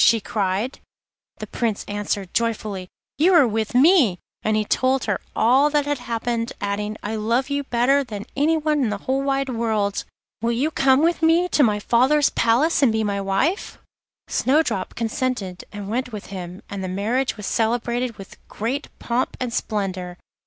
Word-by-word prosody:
she 230 Hz, -, +5 dB
cried. 205 Hz, +4 st, -2 dB, 0.6 s
The -, -, -6 dB
Prince 225 Hz, -4 st, -2 dB
answered 205 Hz, -2 st, -3 dB
joyfully, 215 Hz, -5 st, -1 dB, 0.3 s
'You 355 Hz, +4 st, +5 dB
are 290 Hz, -7 st, +6 dB
with 220 Hz, +1 st, -2 dB
me,' 270 Hz, -, +5 dB, 0.2 s
and 215 Hz, 0 st, +1 dB
he 215 Hz, -, 0 dB
told 260 Hz, +4 st, +1 dB
her -, -, -1 dB
all 265 Hz, +6 st, +4 dB
that 295 Hz, -1 st, +1 dB
had 290 Hz, -2 st, -1 dB
happened, 235 Hz, 0 st, -2 dB
adding, 210 Hz, +1 st, -3 dB
'I 220 Hz, +2 st, -3 dB
love 235 Hz, +6 st, 0 dB
you 285 Hz, 0 st, -1 dB
better 265 Hz, +3 st, +2 dB
than 210 Hz, -5 st, -7 dB
anyone 305 Hz, 0 st, +2 dB
in 235 Hz, -, +1 dB
the 205 Hz, -, -2 dB
whole 265 Hz, +1 st, +1 dB
wide 275 Hz, 0 st, 0 dB
world. 220 Hz, -4 st, -1 dB, 0.4 s
Will 235 Hz, +1 st, +1 dB
you 275 Hz, +7 st, 0 dB
come 270 Hz, 0 st, +3 dB
with 340 Hz, +1 st, +2 dB
me 330 Hz, +2 st, +4 dB
to 305 Hz, -, +2 dB
my 210 Hz, -6 st, +3 dB
father's 265 Hz, +7 st, +3 dB
palace 255 Hz, +9 st, +2 dB
and 265 Hz, -5 st, +5 dB
be 220 Hz, 0 st, 0 dB
my 200 Hz, -1 st, -1 dB
wife?' 195 Hz, -, -1 dB, 0.5 s
Snowdrop 265 Hz, -9 st, +1 dB
consented, 230 Hz, -5 st, -2 dB
and 205 Hz, -1 st, -7 dB
went 250 Hz, +4 st, -2 dB
with 210 Hz, -2 st, -7 dB
him, 180 Hz, -1 st, -7 dB
and 200 Hz, -1 st, -5 dB
the -, -, -3 dB
marriage 225 Hz, +8 st, -1 dB
was 210 Hz, -, -6 dB
celebrated 240 Hz, +1 st, -1 dB
with 195 Hz, -, -11 dB
great 255 Hz, +7 st, -3 dB
pomp 245 Hz, +2 st, -2 dB
and 250 Hz, -2 st, -3 dB
splendour. 185 Hz, -6 st, -3 dB
235 Hz, 175 wpm, -22 LUFS, 210-270 Hz, 0.6 s, are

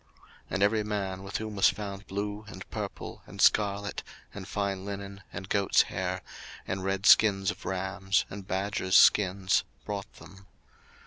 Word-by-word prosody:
02:035:023 -, -, -34 dB, 0.4 s
And 100 Hz, -, 0 dB
every 105 Hz, +1 st, +3 dB
man, 100 Hz, -3 st, -3 dB
with 100 Hz, +1 st, -4 dB
whom 110 Hz, -1 st, -5 dB
was 100 Hz, -, +5 dB
found 100 Hz, +1 st, -6 dB
blue, 105 Hz, +2 st, -4 dB
and -, -, -9 dB
purple, -, -, -6 dB
and -, -, -12 dB
scarlet, 100 Hz, -1 st, +2 dB, 0.3 s
and 95 Hz, -2 st, -8 dB
fine 100 Hz, -2 st, -2 dB
linen, 100 Hz, 0 st, -6 dB
and 95 Hz, -, -7 dB
goats' 100 Hz, -1 st, +3 dB
hair, -, -, -3 dB, 0.4 s
and 95 Hz, 0 st, -3 dB
red 95 Hz, +1 st, -1 dB
skins 95 Hz, -4 st, +6 dB
of -, -, -12 dB
rams, 95 Hz, +1 st, 0 dB
and 100 Hz, -1 st, -9 dB
badgers' 95 Hz, 0 st, +1 dB
skins, 95 Hz, -1 st, +4 dB, 0.2 s
brought 100 Hz, -1 st, -5 dB
them. 95 Hz, 0 st, -15 dB
100 Hz, 155 wpm, -29 LUFS, 95-100 Hz, 0.4 s, skins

